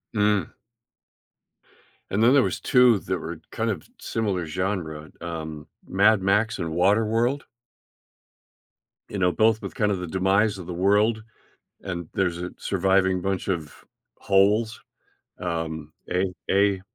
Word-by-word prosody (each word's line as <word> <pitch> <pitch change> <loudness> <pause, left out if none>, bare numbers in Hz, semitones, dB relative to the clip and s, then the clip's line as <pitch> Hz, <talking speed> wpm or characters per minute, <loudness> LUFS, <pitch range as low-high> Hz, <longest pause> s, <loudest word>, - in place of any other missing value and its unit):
Mm. 105 -4 +2 1.6
And 105 +3 +1
then 125 +3 +6
there 140 - +6
was - - -2
2 125 -6 +5
that 95 - -3
were 80 -1 -7
kind 115 +1 -1
of - - -2
s - - -23
similar 100 -7 -2
genre, 80 -3 -3
um, 80 -3 -6 0.2
Mad 100 +1 +3
Max 105 +4 +2
and 85 -3 -3
Waterworld 110 - +2 1.7
you - - -5
know, 90 -1 +3
both 110 +3 +3
with - - -6
kind 105 -1 +1
of 95 - -1
the 90 - -5
demise 95 +4 +2
of 90 -3 -9
the 90 - -4
world, 105 +4 +2 0.6
and 85 -3 -5
there's 90 -3 0
a 90 +1 -4
surviving 95 -1 +2
bunch 95 0 -2
of 80 -6 -2 0.5
holes, 105 +3 +2 0.6
um, 80 -3 -4 0.2
A 90 0 0 0.2
A, 100 -1 +3
95 Hz, 140 wpm, -25 LUFS, 85-105 Hz, 1.7 s, then